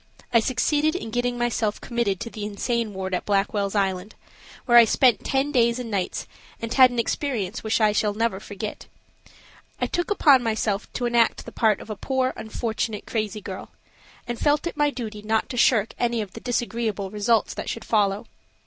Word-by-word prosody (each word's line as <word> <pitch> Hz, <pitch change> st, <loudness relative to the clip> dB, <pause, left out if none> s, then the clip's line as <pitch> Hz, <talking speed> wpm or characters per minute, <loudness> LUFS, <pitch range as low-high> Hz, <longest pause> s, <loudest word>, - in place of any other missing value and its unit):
I 230 Hz, -, +7 dB
succeeded 290 Hz, +7 st, +1 dB
in 225 Hz, -11 st, -4 dB
getting 245 Hz, +1 st, -1 dB, 0.4 s
committed 235 Hz, -6 st, -1 dB
to 230 Hz, -, -5 dB
the 215 Hz, -, -6 dB
insane 220 Hz, +2 st, -2 dB
ward 190 Hz, -1 st, -5 dB
at 180 Hz, -, 0 dB
Blackwell's 200 Hz, 0 st, 0 dB
Island, 195 Hz, 0 st, -1 dB, 0.5 s
where 240 Hz, -1 st, +8 dB
I -, -, +9 dB
spent 235 Hz, 0 st, +3 dB
ten 270 Hz, +2 st, 0 dB
days 235 Hz, -3 st, +3 dB
and 245 Hz, -3 st, -5 dB
nights 195 Hz, -3 st, -2 dB, 0.3 s
and 230 Hz, 0 st, -4 dB
had 255 Hz, -1 st, +7 dB
an 245 Hz, -, -6 dB
experience 235 Hz, -4 st, -2 dB
which 220 Hz, +1 st, +1 dB
I 215 Hz, -1 st, +4 dB
shall 210 Hz, 0 st, 0 dB
never 225 Hz, -3 st, 0 dB
forget. 205 Hz, 0 st, -7 dB, 0.9 s
I -, -, +1 dB
took 350 Hz, -, -2 dB
upon 290 Hz, -10 st, +5 dB
myself 220 Hz, -3 st, -1 dB
to 245 Hz, -, -2 dB
enact 235 Hz, -1 st, +2 dB
the -, -, -8 dB
part 215 Hz, -3 st, +2 dB
of 220 Hz, -, -9 dB
a -, -, -3 dB
poor, 260 Hz, +4 st, -1 dB
unfortunate 220 Hz, -1 st, -3 dB
crazy 215 Hz, -1 st, -3 dB
girl, 190 Hz, -1 st, -8 dB, 0.5 s
and 240 Hz, -1 st, -4 dB
felt 295 Hz, +1 st, +2 dB
it 340 Hz, -, -3 dB
my 295 Hz, -1 st, +2 dB
duty 225 Hz, -6 st, -6 dB
not 220 Hz, +1 st, 0 dB
to -, -, -5 dB
shirk 225 Hz, -3 st, +3 dB
any 240 Hz, -1 st, +1 dB
of 205 Hz, -4 st, -5 dB
the -, -, -8 dB
disagreeable 230 Hz, -5 st, -2 dB
results 210 Hz, +1 st, +1 dB
that -, -, -5 dB
should 230 Hz, -, -5 dB
follow. 205 Hz, -2 st, +1 dB
225 Hz, 185 wpm, -24 LUFS, 210-245 Hz, 0.9 s, I